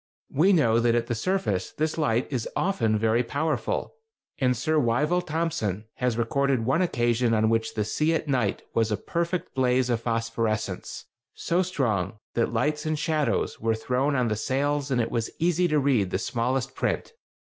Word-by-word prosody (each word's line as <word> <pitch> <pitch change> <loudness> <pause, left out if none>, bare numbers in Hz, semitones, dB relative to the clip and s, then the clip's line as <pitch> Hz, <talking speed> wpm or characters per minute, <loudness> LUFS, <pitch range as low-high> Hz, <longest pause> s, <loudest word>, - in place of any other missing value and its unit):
We 170 +8 +4
know 115 - +4
that 120 0 +3
at 120 0 +1
the 120 - -2
surface 110 - -1
this 155 0 -1
light 120 -6 +1
is 125 -4 -2
often 115 - +1
very 110 +2 +2
powerful, 150 +5 -2 0.5
and 125 -2 +2
Sir 155 +6 +1
Wyville 150 +9 +1
Thomson 155 - -2
has 125 -2 0
recorded 130 +1 +1
one 135 +8 +2
occasion 120 -7 +1
on 110 +1 +2
which 115 0 0
the 105 -2 0
sea 155 +9 +1
at 160 - -2
night 125 -8 0
was 115 -1 +1
"a 105 - +1
perfect 170 - -2
blaze 125 -1 +2
of 115 -1 0
phosphorescence, 115 -2 -2 0.3
so 175 +2 0
strong 110 - -1 0.2
that 115 - +1
lights 150 +6 0
and 155 0 -1
shadows 155 -1 0
were 115 0 +1
thrown 130 +5 0
on 125 -2 +2
the 110 - 0
sails 140 +5 -1
and 130 -2 +1
it 115 - 0
was 115 -1 -1
easy 175 +1 +2
to 155 -2 +1
read 130 -9 +2
the - - 0
smallest 130 +5 -1
print." 465 - -2
125 Hz, 180 wpm, -26 LUFS, 115-150 Hz, 0.5 s, We